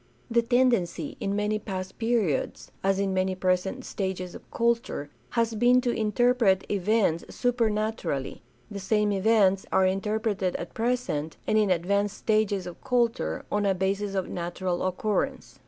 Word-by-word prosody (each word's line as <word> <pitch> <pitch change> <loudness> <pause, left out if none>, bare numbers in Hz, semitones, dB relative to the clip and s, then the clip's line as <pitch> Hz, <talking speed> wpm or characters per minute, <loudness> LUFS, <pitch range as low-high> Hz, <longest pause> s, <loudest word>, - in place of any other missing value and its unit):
The 235 0 +4
tendency 235 - +1
in 200 0 -1
many 210 +1 0
past 190 -3 -6
periods, 225 - 0
as 195 0 +2
in 195 -1 0
many 185 0 0
present 185 +7 0
stages 190 -2 -3
of - - -12
culture, 235 - -1 0.3
has 230 0 +2
been 245 +3 +4
to 245 -1 0
interpret 220 -2 +2
events 200 -4 +1
supernaturally; 220 - -1 0.3
the 200 - -5
same 210 +2 +1
events 195 -1 +3
are 190 - +4
inter 195 +3 0
preted 200 -5 -1
at 170 - -5
present, 225 -11 -1
and - - +1
in 215 -2 +3
advanced 200 +3 +1
stages 215 -3 +1
of 175 - -9
culture, 235 - 0
on 205 0 +1
a 195 -1 +2
basis 195 +2 -1
of 190 -2 -1
natural 175 +1 -3
occurrence. 200 +3 -2
200 Hz, 150 wpm, -27 LUFS, 185-225 Hz, 0.3 s, The